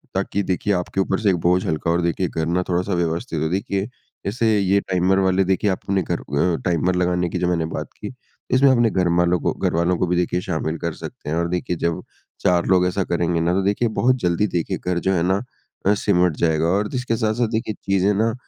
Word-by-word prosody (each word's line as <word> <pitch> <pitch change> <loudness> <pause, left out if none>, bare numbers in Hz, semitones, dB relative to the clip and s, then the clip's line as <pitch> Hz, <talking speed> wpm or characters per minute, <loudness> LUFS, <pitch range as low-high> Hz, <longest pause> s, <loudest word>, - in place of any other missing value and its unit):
ताकि 100 - -1
देखिए 95 +3 0
आपके 90 +1 -1
ऊपर 95 0 0
से 105 - +2
एक 95 - +3
बोझ 90 +2 +2
हल्का 80 +1 -1
हो 85 - +3
और 85 - +1
देखिए 85 +2 0
घर 80 - -2
ना 90 +3 0
थोड़ा-सा 90 +2 0
व्यवस्थित 85 -2 -1
हो। 80 - 0
देखिए 95 +1 -1 0.4
जैसे 110 +1 +1
ये 100 +1 +3
टाइमर 95 +1 +1
वाले 95 0 +2
देखिए, 95 +2 +1
आप 95 - -2
अपने 95 -1 0
घर - - -2
अ, 80 +5 0
टाइमर 90 0 +1
लगाने 90 -1 +1
की 90 - -3
जो 90 - 0
मैंने 85 -2 0
बात 80 - -5
की 105 +3 -6 0.4
इसमें 135 +2 +5
अपने 120 -3 +3
घरमालों 90 -1 +2
को - - 0
घरवालों 85 +2 0
को 90 - 0
भी 90 - +1
देखिए 90 0 0
शामिल 85 -3 -2
कर 85 -2 -3
सकते - - -8
हैं। 80 - -1
और 85 - 0
देखिए 90 0 -2
जब 85 0 -1 0.4
चार 90 -1 +2
लोग 90 -1 +4
ऐसा 95 +2 -1
करेंगे 85 -1 0
ना, 85 +1 +1
तो 95 - +1
देखिए 105 +4 +1
बहुत 130 +1 +4
जल्दी 90 +3 +1
देखिए 85 -4 -2
घर 90 -1 -2
जो 95 - +3
है 85 -2 +1
ना? 95 +2 +2 0.5
अ, 105 - +5
सिमट 90 -4 +2
जाएगा। 80 -1 +1
और 100 +4 +1
जिसके 125 -3 -2
साथ-साथ 110 +1 0
देखिए 110 -1 -2
चीज़ें 100 +1 +2
ना 110 +3 +1
90 Hz, 230 wpm, -21 LUFS, 85-100 Hz, 0.5 s, इसमें